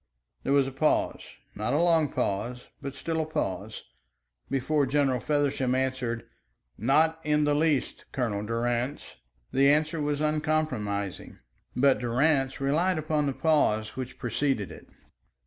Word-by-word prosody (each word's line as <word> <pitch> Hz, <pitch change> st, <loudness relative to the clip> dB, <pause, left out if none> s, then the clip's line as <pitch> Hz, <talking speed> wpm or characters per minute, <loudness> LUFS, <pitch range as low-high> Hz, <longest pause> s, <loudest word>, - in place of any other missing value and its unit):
There -, -, -2 dB
was 140 Hz, -1 st, +4 dB
a 135 Hz, -, -4 dB
pause 145 Hz, +4 st, +1 dB, 0.3 s
not 105 Hz, +4 st, -2 dB
a 145 Hz, -, +3 dB
long 165 Hz, -4 st, +3 dB
pause, 120 Hz, +5 st, -2 dB
but 140 Hz, -1 st, -6 dB
still 160 Hz, +3 st, -2 dB
a -, -, -2 dB
pause 100 Hz, -, -3 dB, 0.7 s
before 140 Hz, +2 st, +1 dB
General 135 Hz, -2 st, +2 dB
Feversham 140 Hz, -3 st, 0 dB
answered: 130 Hz, -3 st, -1 dB, 0.5 s
"Not 155 Hz, +8 st, +2 dB
in 150 Hz, 0 st, +2 dB
the 145 Hz, 0 st, +2 dB
least, 150 Hz, -2 st, 0 dB
Colonel 110 Hz, -6 st, -1 dB
Durrance." 120 Hz, +4 st, -2 dB, 0.4 s
The 135 Hz, +1 st, +5 dB
answer 155 Hz, +2 st, +2 dB
was 145 Hz, -1 st, -1 dB
uncompromising, 150 Hz, -, -1 dB, 0.4 s
but 135 Hz, +1 st, +4 dB
Durrance 135 Hz, +3 st, +1 dB
relied 160 Hz, +7 st, +1 dB
upon 155 Hz, -1 st, 0 dB
the 140 Hz, -, 0 dB
pause 130 Hz, -9 st, +1 dB
which 130 Hz, 0 st, -6 dB
preceded 125 Hz, -3 st, -1 dB
it. -, -, -12 dB
135 Hz, 135 wpm, -28 LUFS, 125-150 Hz, 0.7 s, The